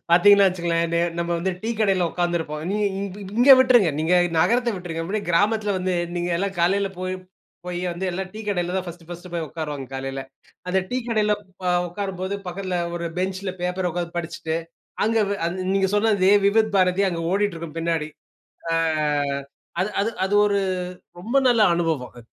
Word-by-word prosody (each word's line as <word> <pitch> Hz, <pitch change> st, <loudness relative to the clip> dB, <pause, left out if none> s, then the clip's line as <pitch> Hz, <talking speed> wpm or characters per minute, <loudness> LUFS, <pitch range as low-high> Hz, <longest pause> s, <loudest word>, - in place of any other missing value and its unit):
பார்த்தீங்கன்னா 200 Hz, +4 st, +7 dB
வைச்சுக்கங்களேன். 170 Hz, -2 st, 0 dB
நெ 170 Hz, -, +2 dB, 0.2 s
நம்ம 170 Hz, 0 st, -2 dB
வந்து 185 Hz, +3 st, -1 dB
டீ 225 Hz, -, -2 dB
கடையில 190 Hz, -5 st, +2 dB
உட்கார்ந்திருப்போம். 170 Hz, -4 st, -2 dB
நீ -, -, -1 dB, 0.2 s
நீ -, -, -3 dB, 0.2 s
இ 205 Hz, -, -10 dB
இ -, -, -7 dB
இங்கே 270 Hz, +3 st, +9 dB
விட்டுருங்க. 245 Hz, -9 st, +5 dB
நீங்க 165 Hz, +3 st, +2 dB, 0.2 s
நகரத்த 235 Hz, +8 st, +3 dB
விட்டுருங்க. 175 Hz, -3 st, -5 dB
அப்படியே 205 Hz, +4 st, -2 dB
கிராமத்தில 205 Hz, +3 st, +2 dB
வந்து, 185 Hz, 0 st, -1 dB, 0.2 s
நீங்க 175 Hz, 0 st, -1 dB
எல்லாம் 195 Hz, +2 st, -2 dB
காலையில 195 Hz, +3 st, +2 dB
போய் 185 Hz, 0 st, -2 dB, 0.5 s
போயி 175 Hz, -1 st, -3 dB
வந்து 175 Hz, +3 st, -5 dB
எல்லாம் 190 Hz, +1 st, -4 dB
டீ 220 Hz, -, -6 dB
கடையில 180 Hz, -2 st, -1 dB
தான் 185 Hz, -, -2 dB
பர்ஸ்ட், 170 Hz, -1 st, -9 dB
பர்ஸ்ட் 175 Hz, +1 st, -8 dB
போய் 165 Hz, -2 st, -2 dB
உட்காருவாங்க, 150 Hz, -4 st, -5 dB
காலையில. 135 Hz, 0 st, -4 dB, 0.5 s
அந்த 190 Hz, +1 st, +2 dB
டீ 255 Hz, -, 0 dB
கடையில 215 Hz, -2 st, +2 dB, 0.5 s
உட்காரும்போது 190 Hz, +1 st, -4 dB
பக்கத்தில 185 Hz, 0 st, -3 dB, 0.2 s
ஒரு 170 Hz, 0 st, -3 dB
பெஞ்ச்ல 185 Hz, +1 st, -2 dB
பேப்பர் 180 Hz, 0 st, -1 dB
உட்கார்ந்து 175 Hz, 0 st, -4 dB
படிச்சிட்டு, 160 Hz, -1 st, -3 dB, 0.5 s
அங்க 225 Hz, +1 st, +2 dB
வெ -, -, +1 dB
அது 170 Hz, +2 st, -3 dB, 0.2 s
நீங்க 195 Hz, -1 st, +2 dB
சொன்ன 220 Hz, +2 st, +3 dB
அதே 190 Hz, +2 st, +5 dB
விபத் 215 Hz, +1 st, +2 dB
பாரதி 185 Hz, +1 st, +3 dB
அங்க 170 Hz, -2 st, -3 dB
ஓடிட்டு 205 Hz, -2 st, +1 dB
இருக்கும் 165 Hz, -1 st, -8 dB
பின்னாடி. 165 Hz, -2 st, -1 dB, 0.6 s
ஆ -, -, +2 dB, 1.1 s
அது 190 Hz, -, +1 dB
அது 205 Hz, +3 st, +1 dB, 0.2 s
அது 190 Hz, -, -2 dB
ஒரு 200 Hz, -1 st, +2 dB, 0.6 s
ரொம்ப 230 Hz, +9 st, -4 dB
நல்ல 235 Hz, -2 st, +4 dB
அனுபவம். 155 Hz, -8 st, -2 dB
185 Hz, 175 wpm, -23 LUFS, 170-200 Hz, 1.1 s, இங்கே